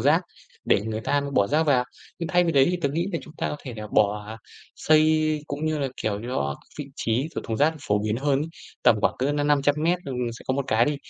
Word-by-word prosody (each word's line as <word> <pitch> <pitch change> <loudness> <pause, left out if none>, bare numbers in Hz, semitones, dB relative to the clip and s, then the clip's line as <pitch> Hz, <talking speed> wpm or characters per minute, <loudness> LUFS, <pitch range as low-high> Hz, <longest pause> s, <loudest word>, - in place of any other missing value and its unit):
rác - - +4 0.4
để - - +3
người 110 +1 -3
ta 145 +6 +1
bỏ 100 - +4
rác 155 +6 +2
vào. 135 -5 +3 0.3
Nhưng 170 -1 -3
thay 180 -1 +3
vì 165 - +1
đấy 135 -2 +5
thì 180 - 0
tớ 140 - +2
nghĩ 165 +6 -1
thì - - 0
chúng 155 - -13
ta - - -1
có 150 - -4
thể 125 -4 -7
là 105 - -6
bỏ 105 +1 +1 0.4
xây, 155 0 +3
cũng 145 +2 -4
như 155 -1 0
là, 140 - -1
kiểu, 105 -1 -1
cho 70 - -1 0.2
vị 150 - -3
trí 120 +7 0
của - - -2
thùng 110 - -2
rác 155 +5 +3
phổ 105 - +3
biến 110 +1 0
hơn 135 +1 +1
ấy, 150 - -2 0.4
tầm 110 - +5
khoảng - - +2
cỡ 135 +3 +1
năm 145 0 0
năm 145 -1 +3
trăm 145 +1 +3
mét, 170 +3 +2
ừm, 135 -3 -4 0.2
sẽ - - -13
có 130 - +2
một 140 0 -1
cái 110 +2 +3
đi. 145 +2 0
140 Hz, 265 wpm, -25 LUFS, 110-155 Hz, 0.4 s, đấy